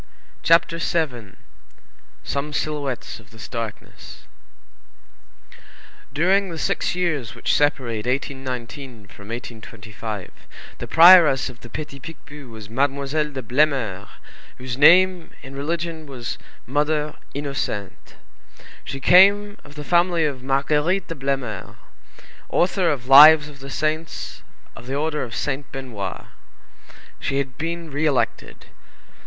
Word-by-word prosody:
CHAPTER 165 0 +3
VII—SOME 135 - -6
SILHOUETTES 145 -6 -3
OF 110 - -19
THIS 110 0 -11
DARKNESS 115 -3 -8 1.9
During 190 +5 +2
the 165 - -6
six 160 - -1
years 150 -10 -2
which 115 - -1
separate 125 -7 0
1819 130 -2 -5
from 100 +1 -14
1825, 110 -3 -8 0.5
the - - -6
prioress 165 -6 +7
of 120 - -18
the 120 - -11
Petit 140 +1 -7
Picpus 150 -1 -11
was 110 -2 -10
Mademoiselle 140 +5 -1
de 135 -2 -6
Blemeur, 120 -6 0 0.5
whose 130 -1 -5
name, 180 +4 +5
in 135 +1 -10
religion, 160 +2 -4
was 125 -4 -6 0.3
Mother 150 +2 -1 0.2
Innocente. 140 -9 -5 0.7
She 135 - -6
came 200 +6 +5
of 145 0 -15
the 150 - -7
family 170 0 +2
of 140 -4 -3
Marguerite 150 +7 0
de - - -3
Blemeur, 135 - -4 0.7
author 180 0 +1
of 130 -5 -3
Lives 150 +3 +9
of 145 -2 -13
the 135 +1 -9
Saints 155 +3 -3 0.3
of 120 - -12
the 135 - -3
Order 150 +1 -1
of 120 -3 -5
Saint 140 -1 -3
Benoît. 115 -8 -6 0.9
She 135 - -2
had 135 -2 -3
been 165 0 -4
re 150 +3 0
elected. 140 -4 -2
140 Hz, 120 wpm, -22 LUFS, 125-160 Hz, 1.9 s, Lives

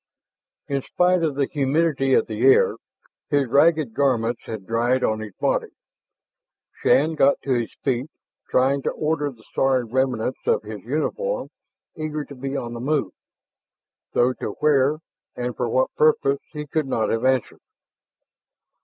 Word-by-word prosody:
In 140 -1 -1
spite 180 +5 +2
of 155 -4 0
the 140 0 +1
humidity 140 -1 +1
of - - +3
the 110 0 -5
air, 135 +1 +5 0.5
his 145 -1 +2
ragged 150 -1 +3
garments 120 -4 0
had 110 -4 -6
dried 120 +4 +1
on 110 0 +1
his 110 -3 -8
body. - - 0 1.1
Shann 155 +4 +3
got 140 -2 +3
to 135 - 0
his 120 -2 -2
feet, 130 +1 -1 0.4
trying 135 +2 +2
to - - -1
order 150 -1 -1
the 115 -5 -15
sorry 130 -2 +2
remnants 125 0 -1
of - - +2
his 105 -1 -8
uniform, - - -2 0.5
eager 155 -1 -4
to - - -11
be 135 +1 -4
on 120 -2 -5
the 120 - -6
move. 145 +2 0 1.0
Though 125 +1 +3
to - - -5
where 145 -1 +3 0.4
and 125 -1 -3
for 120 -2 -2
what 130 +3 +1
purpose 140 -2 +3
he 150 -1 -6
could 150 0 -1
not 110 -4 0
have 115 +1 -1
answered. 130 -2 0
135 Hz, 155 wpm, -23 LUFS, 120-150 Hz, 1.1 s, air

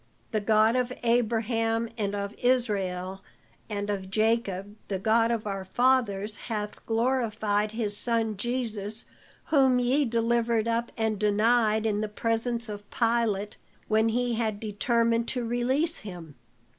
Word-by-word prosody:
The 215 -2 0
God 215 +2 +4
of 250 -1 0
Abraham, 230 -1 +1
and 205 -3 -2
of 200 0 -3
Israel, 195 -7 0 0.5
and 205 -1 -3
of 190 -2 -4
Jacob, 205 -2 0
the 195 - -2
God 225 +3 +3
of 230 -2 -1
our 195 -2 -3
fathers 215 -2 +1
hath 210 -3 -5
glorified 220 -3 0
his 215 -3 -2
son 225 0 0
Jesus, 220 -2 -3 0.5
whom 265 -4 +5
ye 255 +4 +2
delivered 230 -1 +1
up 230 +1 -1
and 220 -2 0
denied 215 +1 +3
in 210 -1 +1
the 215 - -2
presence 230 +2 0
of 205 -1 -8
Pilate 225 -4 0 0.3
when 220 +1 +3
he 245 +1 0
had 220 -3 -1
determined 230 +2 +1
to 250 -2 -2
release 260 +8 +1
him. 175 -7 -9
225 Hz, 135 wpm, -27 LUFS, 210-235 Hz, 0.5 s, whom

